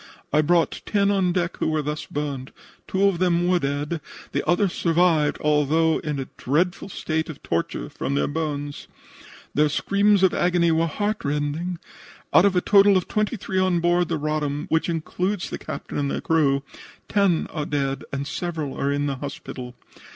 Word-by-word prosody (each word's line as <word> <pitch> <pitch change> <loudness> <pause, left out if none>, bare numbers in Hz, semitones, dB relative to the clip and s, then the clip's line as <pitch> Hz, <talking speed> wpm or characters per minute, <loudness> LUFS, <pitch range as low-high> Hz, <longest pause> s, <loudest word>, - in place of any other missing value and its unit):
I 150 - +5
brought 170 +2 +2
ten 200 -1 +2
on 190 -3 +2
deck 175 -1 -1
who - - -1
were 155 -1 0
thus 150 +1 -4
burned; 140 -3 -4 0.4
two 190 +1 0
of 195 -4 +3
them 175 -1 +2
were 180 0 +3
dead, 145 +2 -2 0.3
the - - -1
others 180 +1 +2
survived, 165 -3 +2
although 150 +2 +2
in 150 -2 -3
a 135 - -3
dreadful 175 +8 0
state 160 -3 -2
of 155 - -9
torture 85 - -2
from 140 - -3
their - - +2
burns. 145 -2 -4 0.7
Their 150 +1 +3
screams 200 +5 +2
of 190 - +5
agony 175 -1 +2
were 165 +1 +2
heartrending. 165 -3 -2 0.6
Out 180 - +7
of 200 -2 +3
a 180 - +3
total 200 0 +6
of 185 - -2
twenty 215 +3 0
three 190 -1 -2
on 185 -2 +2
board 175 +1 +2
the 165 - -1
Roddam, 150 -1 -2
which 160 +2 +1
includes 180 +4 -2
the - - -4
captain - - -5
and 140 -1 0
the - - -2
crew, 140 -4 +2 0.4
ten 195 -5 +2
are 150 -2 -3
dead 140 -2 -1
and 140 0 -3
several 160 -3 -3
are 140 - 0
in 145 0 0
the 140 -2 -2
hospital. 130 -2 -7
160 Hz, 180 wpm, -24 LUFS, 145-180 Hz, 0.7 s, Out